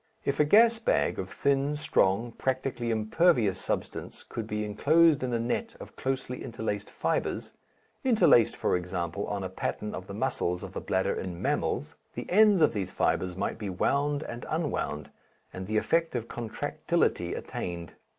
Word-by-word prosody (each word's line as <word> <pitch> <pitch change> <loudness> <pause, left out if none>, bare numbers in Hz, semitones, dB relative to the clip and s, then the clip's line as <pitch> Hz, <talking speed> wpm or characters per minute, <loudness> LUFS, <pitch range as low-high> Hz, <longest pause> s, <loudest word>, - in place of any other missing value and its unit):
If 140 - 0
a 150 - +5
gas 225 +7 +6
bag 225 - +1
of 95 - -4
thin, 140 +4 +1
strong, 115 -5 +1
practically 130 -1 -2
impervious 110 - +2
substance - - -4
could 110 -2 -6
be 105 0 -2
enclosed 155 +9 +4
in 130 -1 -1
a 120 - +1
net 125 - -2
of - - -11
closely 130 -1 -3
interlaced 110 -3 -4
fibres - - -2 0.5
(interlaced, 180 - +5
for - - +1
example, 90 +1 -3
on 100 -1 -3
the 95 - -3
pattern 105 +3 -3
of 95 - -6
the 100 - -7
muscles 100 -7 -1
of 95 -1 -8
the - - -4
bladder 95 +1 0
in 90 -2 -5
mammals), - - -1 0.2
the - - -4
ends 205 -3 +6
of - - +4
these 95 -3 -2
fibres 90 -1 0
might 100 - -2
be 105 - -4
wound 140 +10 0
and 120 +1 -7
unwound, 145 - -2 0.4
and 95 0 -6
the 110 +1 0
effect 165 +6 +1
of 115 -1 -2
contractility 115 -2 -1
attained. 85 -1 -5
115 Hz, 165 wpm, -28 LUFS, 95-145 Hz, 0.5 s, gas